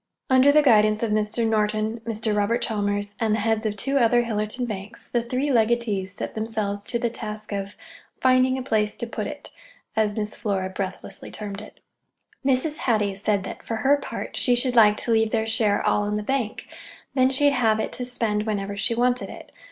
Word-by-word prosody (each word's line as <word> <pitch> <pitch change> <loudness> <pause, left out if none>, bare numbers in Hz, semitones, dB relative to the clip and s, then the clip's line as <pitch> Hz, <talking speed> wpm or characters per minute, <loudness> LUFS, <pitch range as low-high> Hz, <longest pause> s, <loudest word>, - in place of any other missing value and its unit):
Under 260 +2 +6
the 300 +1 +5
guidance 215 -4 +4
of 225 - 0
Mr. 215 +2 +1
Norton, 215 +1 0
Mr. 220 -1 -1
Robert 210 +3 +1
Chalmers, 205 -1 -1
and 220 -2 +2
the - - -1
heads 220 +1 0
of 210 - -3
two 275 +6 0
other 240 0 +4
Hillerton 225 +2 -2
banks, 205 0 -7
the 240 - 0
three 255 +5 -1
legatees 220 -5 +1
set - - -5
themselves 215 -2 -3
to 235 - -1
the 235 -1 -1
task 215 -2 -7
of 200 0 -4 0.4
"finding 255 0 +3
a 260 - -4
place 215 -4 0
to - - -3
put 235 - -4
it," - - -9 0.4
as 210 -1 +1
Miss 210 -1 -3
Flora 190 -3 -2
breathlessly 190 0 -6
termed 205 -1 -6
it. 215 - -14 0.6
Mrs. 275 +3 +1
Hattie 215 -8 +1
said 200 0 0
that, - - -7
for 225 - -4
her 265 +6 +3
part, 285 - -6
she 245 - +3
should 245 0 +1
like 210 -2 +6
to 235 - -2
leave 220 -1 +3
their 220 0 0
share 220 -2 +1
all 205 - +2
in 210 0 -1
the 210 - -2
bank: 250 -2 -2 0.5
then 260 -1 +4
she'd 285 +2 +3
have 225 -4 +2
it - - -2
to 250 - -5
spend 225 -4 -1
whenever 200 -1 -2
she 230 +3 +1
wanted 245 +1 +1
it. - - -11
220 Hz, 200 wpm, -24 LUFS, 210-245 Hz, 0.6 s, Under